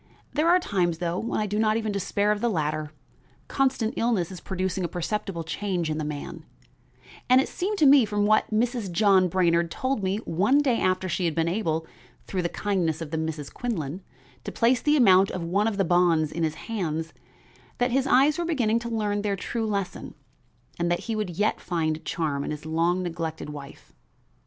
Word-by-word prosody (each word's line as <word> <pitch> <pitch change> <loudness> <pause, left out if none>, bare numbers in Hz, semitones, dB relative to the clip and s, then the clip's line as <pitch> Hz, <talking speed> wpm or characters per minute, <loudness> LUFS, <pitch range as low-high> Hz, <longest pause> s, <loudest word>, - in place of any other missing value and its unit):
There 310 +3 +2
are 360 +1 +6
times, 175 - 0
though, 170 +1 -2
when 230 - -2
I 215 - 0
do 210 +1 -2
not 215 0 +2
even 220 -2 -2
despair 200 +1 0
of 210 0 -1
the 240 - +2
latter; 155 -4 -2 0.6
constant 260 -5 0
illness 220 -7 0
is 185 - -9
producing 190 0 -2
a - - 0
perceptible 175 0 -3
change 175 -2 -2
in 155 - -2
the - - -2
man, 150 -1 -6 0.9
and 255 +1 +7
it 265 - +1
seemed 410 +4 -3
to 310 - +4
me, 275 -2 +7
from 205 -1 0
what 215 +1 +3
Mrs. 230 -2 -1
John 190 0 +4
Brainard 170 -1 +2
told 260 +6 -2
me 190 +1 0
one 200 - +2
day 265 -5 +2
after 185 0 +1
she 180 +1 -1
had 165 -3 0
been 165 0 +1
able, 165 -4 -1 0.4
through 185 - -2
the 170 - -1
kindness 175 -7 -1
of 160 -3 -6
the 160 - -1
Misses 160 -3 -4
Quinlan, 180 - -4 0.4
to - - -5
place 245 +2 +2
the 300 0 +3
amount 195 -6 +6
of 180 - -4
one 195 +6 +1
of 215 -3 -2
the 195 - +2
bonds 170 -3 +3
in 170 - -4
his 160 -1 0
hands, 165 -7 -3 0.6
that 245 0 +1
his 270 +2 +1
eyes 280 +5 +4
were 345 - -1
beginning 235 -9 +1
to 235 0 -6
learn 210 -2 -1
their 205 -1 -1
true 225 +3 -3
lesson 200 -3 -4 0.6
and 170 0 0
that 175 - 0
he 225 -2 -3
would 210 -3 -2
yet 205 +5 0
find 160 -2 -2
charm 145 -4 -2
in - - -4
his 150 0 -6
long 170 +3 +1
neglected 165 -3 -4
wife. 140 -2 -11
190 Hz, 205 wpm, -26 LUFS, 165-225 Hz, 0.9 s, and